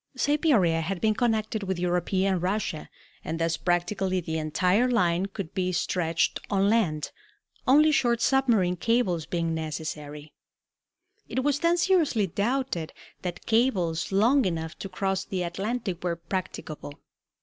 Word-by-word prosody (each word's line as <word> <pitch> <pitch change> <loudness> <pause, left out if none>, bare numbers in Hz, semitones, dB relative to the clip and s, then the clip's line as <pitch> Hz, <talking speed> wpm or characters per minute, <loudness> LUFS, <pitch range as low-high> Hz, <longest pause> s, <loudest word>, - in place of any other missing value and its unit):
Siberia 260 - +2
had 180 +3 -3
been 215 +2 +2
connected 220 -1 0
with 190 -2 -2
European 180 +2 +1
Russia, 185 -3 -2 0.3
and 160 - -3
thus 165 0 +1
practically 185 +2 0
the 160 -2 -3
entire 180 +10 +2
line 180 -5 +2
could 195 -4 -7
be 185 -1 0
stretched 170 -2 0
on 200 0 +2
land, 165 -10 +1 0.6
only 300 +4 +6
short 240 -5 +2
submarine 235 -9 +2
cables 190 -7 +1
being 165 -2 -1
necessary. 155 -2 -5 1.0
It 260 - -1
was 290 0 +1
then 340 +2 +2
seriously 335 - +2
doubted 205 -2 -2 0.3
that 180 -2 -5
cables 195 -10 +1
long 235 +8 +4
enough 160 -3 -2
to 195 - -6
cross 190 0 -1
the 185 -2 -3
Atlantic 190 +1 -3
were 175 -2 0
practicable. 165 -4 -6
190 Hz, 135 wpm, -27 LUFS, 170-230 Hz, 1.0 s, only